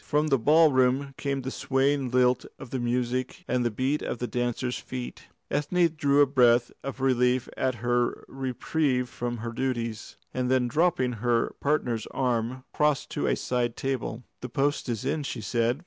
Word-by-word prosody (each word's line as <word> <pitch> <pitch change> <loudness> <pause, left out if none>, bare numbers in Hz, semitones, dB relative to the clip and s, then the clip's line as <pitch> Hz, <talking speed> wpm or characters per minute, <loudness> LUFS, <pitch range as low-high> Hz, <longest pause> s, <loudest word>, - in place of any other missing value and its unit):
From 150 +1 +1
the 135 -2 +3
ballroom 140 -1 +4
came 140 -1 -2
the 130 - -3
swaying 135 0 +1
lilt 125 0 +2
of 130 - -10
the 130 - -2
music 125 +5 -1
and 125 0 +1
the 120 - +2
beat 130 +7 -1
of - - -3
the 125 - -3
dancers' 120 +1 -2
feet. 125 -1 -7 0.3
Ethne 170 +4 +2
drew 145 -2 +3
a - - +7
breath 120 -3 +4
of 135 0 -5
relief 125 -1 +2
at 130 -1 0
her 120 0 +1
reprieve 130 0 -1
from 120 0 -4
her 115 - -3
duties, 115 -3 -3 0.2
and 125 -1 -1
then 130 -1 +3
dropping 150 -3 +2
her 120 -1 +1
partner's 125 -6 0
arm, 125 0 -1
crossed 150 -2 +1
to - - -1
a - - +2
side 120 -2 -1
table. 130 -3 -3 0.2
"The 125 - -6
post 140 +2 0
is 120 +1 -3
in," 150 +3 0
she 135 -4 -4
said. 120 +4 0
130 Hz, 175 wpm, -27 LUFS, 120-140 Hz, 0.3 s, a